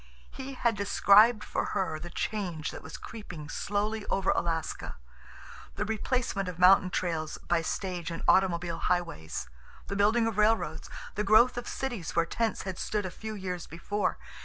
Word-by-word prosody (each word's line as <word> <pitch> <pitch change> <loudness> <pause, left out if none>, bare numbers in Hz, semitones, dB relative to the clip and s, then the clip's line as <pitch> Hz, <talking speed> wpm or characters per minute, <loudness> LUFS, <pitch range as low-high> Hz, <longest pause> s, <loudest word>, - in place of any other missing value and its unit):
He 270 0 -7
had 235 -3 +1
described 205 +2 +5
for - - -2
her 160 -5 -1
the 175 +2 -7
change 175 -5 -3
that - - -8
was - - -8
creeping 180 -9 -9
slowly 210 +4 -1
over 195 -1 +1
Alaska, 165 -2 -2 0.8
the 210 - -1
replacement 220 -3 -1
of 175 - -7
mountain 185 +1 +6
trails 165 -4 -2
by 170 -1 +2
stage 175 0 -3
and 165 - -5
automobile 175 -3 +3
highways, 165 - -2 0.4
the 200 - -2
building 215 +3 +3
of 225 -2 -1
railroads, 220 +2 +1 0.2
the 210 - -1
growth 220 +5 +6
of 245 - -5
cities 240 -10 -4
where 170 - +3
tents 225 +5 -1
had 190 -1 -5
stood 210 -2 -1
a 185 - -4
few 220 +2 -6
years 180 -3 -4
before. 205 +5 -2
195 Hz, 160 wpm, -29 LUFS, 170-215 Hz, 0.8 s, mountain